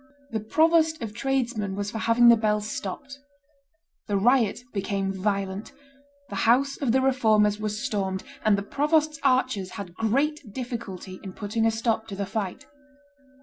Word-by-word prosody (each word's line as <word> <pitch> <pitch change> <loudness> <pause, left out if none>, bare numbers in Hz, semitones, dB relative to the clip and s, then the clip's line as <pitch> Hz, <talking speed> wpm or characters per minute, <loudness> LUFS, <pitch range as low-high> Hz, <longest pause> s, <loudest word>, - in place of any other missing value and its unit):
The 220 - -1
provost 320 +7 +3
of 215 -2 -5
tradesmen 235 -6 -1
was 205 0 -3
for 220 - -4
having 235 +2 +5
the 235 - +8
bells 210 -1 0
stopped; 270 +8 -6 0.9
the 205 -2 +1
riot 240 +1 +2
became 195 -1 -1
violent; 195 +1 -2 0.6
the 200 - -5
house 275 +4 +3
of 270 -5 0
the 260 +2 +3
Reformers 215 -6 +3
was 210 0 -3
stormed; 190 -2 -2 0.2
and 210 -2 +4
the 200 - -3
provost's 300 +5 +1
archers 255 -8 +1
had 180 -4 -7
great 275 - 0
difficulty 200 -6 -6
in 190 -2 -8
putting 225 +3 -1
a - - +5
stop 225 0 -1
to 200 - -6
the 200 0 -2
fight. 195 -1 -4
220 Hz, 155 wpm, -26 LUFS, 200-255 Hz, 0.9 s, the